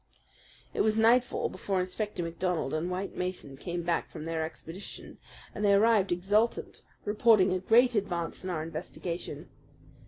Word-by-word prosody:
It -, -, +1 dB
was 215 Hz, 0 st, +2 dB
nightfall 235 Hz, +3 st, +3 dB
before 195 Hz, -2 st, -2 dB
Inspector 185 Hz, +1 st, -3 dB
MacDonald 170 Hz, -3 st, -2 dB
and 160 Hz, +3 st, -1 dB
White 185 Hz, +2 st, -4 dB
Mason 180 Hz, -7 st, -4 dB
came 170 Hz, +5 st, -4 dB
back 170 Hz, 0 st, 0 dB
from 155 Hz, -, -8 dB
their 165 Hz, -1 st, -1 dB
expedition, 165 Hz, +4 st, -8 dB, 0.3 s
and 210 Hz, -, -4 dB
they 200 Hz, -1 st, +5 dB
arrived 210 Hz, -2 st, +4 dB
exultant, 205 Hz, +6 st, +1 dB, 0.2 s
reporting 210 Hz, -3 st, +4 dB
a 185 Hz, -, 0 dB
great 240 Hz, +6 st, +5 dB
advance 190 Hz, -6 st, -2 dB
in 185 Hz, -, -4 dB
our 160 Hz, -3 st, -2 dB
investigation. 165 Hz, +2 st, -6 dB
185 Hz, 150 wpm, -29 LUFS, 170-210 Hz, 0.3 s, they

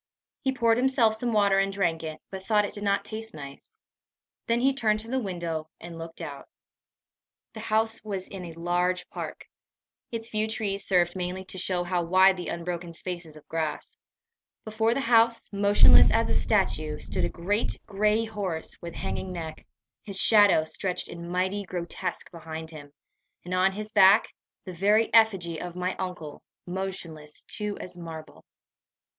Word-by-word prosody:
He 265 Hz, -, +1 dB
poured 230 Hz, -3 st, +2 dB
himself 250 Hz, -3 st, +3 dB
some 235 Hz, +2 st, -2 dB
water 200 Hz, -2 st, +4 dB
and 195 Hz, 0 st, +1 dB
drank 175 Hz, -5 st, 0 dB
it, 155 Hz, -1 st, -6 dB
but 190 Hz, -1 st, -6 dB
thought 210 Hz, 0 st, +3 dB
it -, -, -6 dB
did 205 Hz, -, -7 dB
not 200 Hz, 0 st, +1 dB
taste 220 Hz, +1 st, -7 dB
nice. 140 Hz, -2 st, -11 dB, 0.7 s
Then 235 Hz, 0 st, +2 dB
he 270 Hz, +2 st, +3 dB
turned 215 Hz, -5 st, +1 dB
to 225 Hz, -, -9 dB
the 260 Hz, -, +1 dB
window, 170 Hz, -6 st, -4 dB
and 170 Hz, -1 st, -9 dB
looked 165 Hz, 0 st, -8 dB
out. 140 Hz, -, -8 dB, 1.0 s
The 220 Hz, -, -8 dB
house 220 Hz, +1 st, 0 dB
was 195 Hz, -3 st, -4 dB
in 190 Hz, -2 st, -8 dB
a 165 Hz, -, -8 dB
large 175 Hz, +2 st, 0 dB
park. -, -, -7 dB, 0.6 s
Its 225 Hz, -1 st, -4 dB
few 215 Hz, -1 st, -1 dB
trees 200 Hz, -3 st, -3 dB
served 175 Hz, -2 st, +2 dB
mainly 185 Hz, +1 st, -4 dB
to 185 Hz, -, -6 dB
show 180 Hz, -1 st, 0 dB
how 175 Hz, 0 st, 0 dB
wide 185 Hz, +3 st, +5 dB
the 175 Hz, -3 st, -6 dB
unbroken 170 Hz, 0 st, -4 dB
spaces 170 Hz, -2 st, -5 dB
of 155 Hz, -, -15 dB
grass. 160 Hz, -2 st, -4 dB, 0.7 s
Before 220 Hz, +2 st, +1 dB
the 275 Hz, -, 0 dB
house, 230 Hz, -2 st, +3 dB
motionless 100 Hz, -, +7 dB
as -, -, +2 dB
a -, -, +2 dB
statue, 155 Hz, -1 st, +1 dB
stood -, -, -3 dB
a -, -, 0 dB
great 205 Hz, +6 st, -1 dB
gray 210 Hz, +2 st, +1 dB
horse 195 Hz, -7 st, -4 dB
with 170 Hz, -1 st, -7 dB
hanging 190 Hz, -, -4 dB
neck, 160 Hz, -3 st, -7 dB, 0.3 s
his 195 Hz, -2 st, -2 dB
shadow 205 Hz, -7 st, +6 dB
stretched 180 Hz, +3 st, -2 dB
in 170 Hz, 0 st, -8 dB
mighty 185 Hz, +3 st, -1 dB
grotesque 175 Hz, -2 st, -4 dB
behind 160 Hz, -1 st, -7 dB
him, 145 Hz, -2 st, -11 dB, 0.5 s
and 180 Hz, -, -4 dB
on 185 Hz, +1 st, +3 dB
his 215 Hz, +2 st, -2 dB
back 195 Hz, +1 st, +6 dB, 0.3 s
the 185 Hz, -, -6 dB
very 210 Hz, +5 st, +2 dB
effigy 195 Hz, -8 st, +3 dB
of 175 Hz, -1 st, -6 dB
my 180 Hz, +1 st, -2 dB
uncle, 180 Hz, -5 st, -6 dB, 0.2 s
motionless 175 Hz, -5 st, -6 dB
too 210 Hz, -1 st, -3 dB
as 180 Hz, -1 st, -7 dB
marble. 165 Hz, -2 st, -9 dB
185 Hz, 170 wpm, -27 LUFS, 170-215 Hz, 1.0 s, motionless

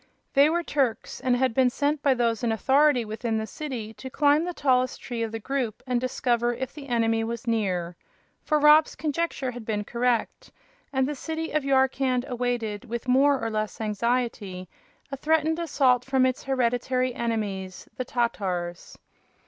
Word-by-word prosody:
They 280 Hz, +2 st, +6 dB
were 340 Hz, +2 st, 0 dB
Turks, 270 Hz, -8 st, -1 dB
and 250 Hz, -1 st, +1 dB
had 255 Hz, -1 st, +1 dB
been 255 Hz, +1 st, +4 dB
sent 290 Hz, +3 st, -1 dB
by 275 Hz, -2 st, +3 dB
those 230 Hz, -2 st, 0 dB
in 235 Hz, -, +1 dB
authority 265 Hz, +2 st, +3 dB
within 220 Hz, +1 st, -2 dB
the 220 Hz, -, -2 dB
city 235 Hz, -5 st, -6 dB
to 260 Hz, -, -9 dB
climb 290 Hz, +3 st, +3 dB
the 355 Hz, -, -2 dB
tallest 255 Hz, -2 st, +1 dB
tree 240 Hz, -2 st, -5 dB
of 225 Hz, -1 st, -2 dB
the 225 Hz, -, -3 dB
group 245 Hz, -1 st, -3 dB
and 250 Hz, -2 st, 0 dB
discover 240 Hz, -1 st, 0 dB
if 260 Hz, +1 st, -5 dB
the 285 Hz, -2 st, -10 dB
enemy 225 Hz, -2 st, +1 dB
was 235 Hz, +2 st, -4 dB
near. 185 Hz, -7 st, -1 dB, 0.5 s
For 305 Hz, -, +2 dB
Rob's 300 Hz, +1 st, +5 dB
conjecture 305 Hz, -4 st, -2 dB
had 245 Hz, -1 st, -8 dB
been 210 Hz, -1 st, -2 dB
correct, 240 Hz, -, -1 dB, 0.4 s
and 265 Hz, -1 st, +1 dB
the 295 Hz, -, -2 dB
city 320 Hz, +3 st, -4 dB
of 305 Hz, -1 st, 0 dB
Yarkand 265 Hz, -2 st, +2 dB
awaited, 240 Hz, -5 st, -2 dB
with 235 Hz, +2 st, -5 dB
more 270 Hz, +2 st, +4 dB
or 225 Hz, 0 st, -3 dB
less 215 Hz, -1 st, -3 dB
anxiety, 215 Hz, -4 st, -2 dB, 0.4 s
a 275 Hz, -, -4 dB
threatened 320 Hz, +3 st, +1 dB
assault 270 Hz, -6 st, +2 dB
from 265 Hz, -1 st, +2 dB
its 255 Hz, -1 st, -1 dB
hereditary 255 Hz, 0 st, 0 dB
enemies, 205 Hz, -6 st, -3 dB
the 255 Hz, -, -1 dB
Tatars. 185 Hz, -8 st, -2 dB
250 Hz, 170 wpm, -26 LUFS, 225-275 Hz, 0.5 s, They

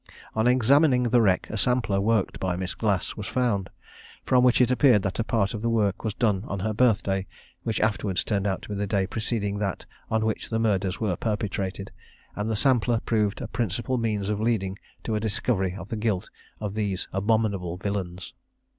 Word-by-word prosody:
On 110 Hz, +2 st, +1 dB
examining 130 Hz, +2 st, +4 dB
the 120 Hz, 0 st, +3 dB
wreck 95 Hz, -4 st, +2 dB
a 110 Hz, -, -3 dB
sampler 110 Hz, -3 st, +1 dB
worked 110 Hz, -1 st, +1 dB
by 95 Hz, -2 st, -1 dB
Miss 95 Hz, +1 st, -3 dB
Glass 100 Hz, -5 st, -1 dB
was 105 Hz, -, -6 dB
found, 115 Hz, -7 st, 0 dB, 0.6 s
from 125 Hz, -1 st, +4 dB
which 125 Hz, -1 st, +4 dB
it 125 Hz, -1 st, +4 dB
appeared 125 Hz, -6 st, +5 dB
that 100 Hz, +1 st, -2 dB
a -, -, +2 dB
part 110 Hz, -3 st, 0 dB
of 110 Hz, -, -4 dB
the 115 Hz, -, 0 dB
work 105 Hz, -4 st, +1 dB
was 110 Hz, -2 st, -2 dB
done 105 Hz, -5 st, +1 dB
on 100 Hz, -, -3 dB
her 110 Hz, +2 st, -1 dB
birthday, 100 Hz, -5 st, +2 dB, 0.3 s
which 110 Hz, -, -2 dB
afterwards 105 Hz, -4 st, 0 dB
turned 100 Hz, -2 st, 0 dB
out 95 Hz, -2 st, -2 dB
to -, -, -10 dB
be -, -, -3 dB
the 100 Hz, 0 st, -2 dB
day 100 Hz, -1 st, +1 dB
preceding 105 Hz, -1 st, -2 dB
that 100 Hz, -3 st, -3 dB, 0.2 s
on 110 Hz, 0 st, +1 dB
which 110 Hz, -, -2 dB
the 115 Hz, -, 0 dB
murders 100 Hz, -4 st, 0 dB
were 105 Hz, -5 st, 0 dB
perpetrated; 100 Hz, -2 st, -3 dB, 0.4 s
and 105 Hz, +2 st, -2 dB
the 110 Hz, -, 0 dB
sampler 120 Hz, -1 st, +3 dB
proved 105 Hz, -1 st, 0 dB
a 120 Hz, -, -4 dB
principal 115 Hz, +2 st, -1 dB
means 105 Hz, -4 st, -1 dB
of 105 Hz, 0 st, -1 dB
leading 100 Hz, -4 st, 0 dB, 0.2 s
to 110 Hz, -, -2 dB
a 105 Hz, -, +1 dB
discovery 100 Hz, -3 st, -1 dB
of 95 Hz, 0 st, -8 dB
the 110 Hz, -, -3 dB
guilt 105 Hz, -4 st, -1 dB, 0.3 s
of 105 Hz, -2 st, -4 dB
these 100 Hz, -4 st, -1 dB
abominable 100 Hz, -3 st, 0 dB
villains. 95 Hz, -2 st, -4 dB
105 Hz, 200 wpm, -26 LUFS, 95-115 Hz, 0.6 s, appeared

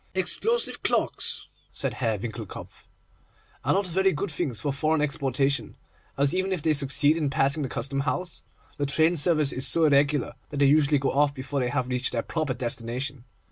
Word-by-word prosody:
'Explosive 445 Hz, -, -1 dB
clocks,' -, -, -1 dB, 0.2 s
said -, -, -3 dB
Herr 115 Hz, -4 st, -1 dB
Winckelkopf, 110 Hz, 0 st, -8 dB, 0.8 s
'are -, -, +2 dB
not 195 Hz, +1 st, +1 dB
very 190 Hz, +2 st, +2 dB
good 165 Hz, +5 st, -3 dB
things 140 Hz, -6 st, -2 dB
for 145 Hz, -2 st, -1 dB
foreign 155 Hz, +3 st, +1 dB
exportation, 140 Hz, -1 st, 0 dB, 0.4 s
as, 140 Hz, 0 st, +3 dB
even 190 Hz, +1 st, 0 dB
if 180 Hz, -6 st, -2 dB
they 160 Hz, -, +3 dB
succeed 145 Hz, +1 st, +3 dB
in 155 Hz, -4 st, 0 dB
passing 140 Hz, +2 st, +1 dB
the 135 Hz, -, -2 dB
Custom 135 Hz, +4 st, -2 dB
House, 160 Hz, +6 st, -3 dB, 0.4 s
the 145 Hz, -, -1 dB
train 160 Hz, +4 st, +3 dB
service 155 Hz, -2 st, +3 dB
is 130 Hz, -, +1 dB
so 165 Hz, -1 st, +3 dB
irregular, 140 Hz, -2 st, +2 dB, 0.2 s
that 145 Hz, -, -6 dB
they 140 Hz, -, +4 dB
usually 145 Hz, +1 st, +4 dB
go 135 Hz, 0 st, 0 dB
off 140 Hz, 0 st, +2 dB
before 135 Hz, +1 st, -3 dB
they 125 Hz, -1 st, 0 dB
have 130 Hz, -1 st, -1 dB
reached 125 Hz, 0 st, -1 dB
their 115 Hz, -, -1 dB
proper 155 Hz, -6 st, -2 dB
destination. 125 Hz, +2 st, -3 dB
140 Hz, 180 wpm, -26 LUFS, 130-155 Hz, 0.8 s, they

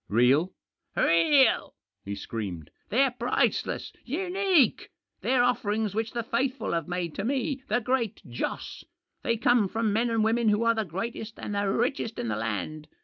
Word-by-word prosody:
"Real?" 130 Hz, -, +4 dB, 0.2 s
" -, -, -49 dB
Real! 210 Hz, -, +4 dB
" -, -, -60 dB
he 100 Hz, +1 st, -4 dB
screamed. 95 Hz, -9 st, -6 dB
" -, -, -43 dB
They're 265 Hz, +4 st, +3 dB
priceless 245 Hz, +1 st, 0 dB
I -, -, -28 dB
unique! 360 Hz, -, +1 dB, 0.3 s
They're 255 Hz, -1 st, +3 dB
offerings 220 Hz, -4 st, 0 dB
which 220 Hz, +1 st, -2 dB
the 235 Hz, -1 st, -2 dB
faithful 255 Hz, +2 st, -1 dB
have 165 Hz, -2 st, -1 dB
made 175 Hz, -2 st, -3 dB
to 195 Hz, -, -4 dB
me, 270 Hz, +2 st, -1 dB
the 230 Hz, +4 st, +1 dB
Great 245 Hz, -3 st, 0 dB
Joss. 120 Hz, 0 st, -4 dB, 0.4 s
They 230 Hz, -, 0 dB
come 225 Hz, -2 st, +3 dB
from 220 Hz, +1 st, 0 dB
men 235 Hz, +3 st, +2 dB
and 225 Hz, -1 st, +1 dB
women 225 Hz, 0 st, +2 dB
who 210 Hz, +2 st, +2 dB
are 230 Hz, 0 st, +4 dB
the 220 Hz, -1 st, -1 dB
greatest 215 Hz, +5 st, -5 dB
and 210 Hz, -, -5 dB
the 200 Hz, -1 st, 0 dB
richest 230 Hz, +1 st, -1 dB
in 115 Hz, -, -2 dB
the 105 Hz, -, 0 dB
land. 115 Hz, +8 st, -3 dB
220 Hz, 180 wpm, -27 LUFS, 170-245 Hz, 0.4 s, Real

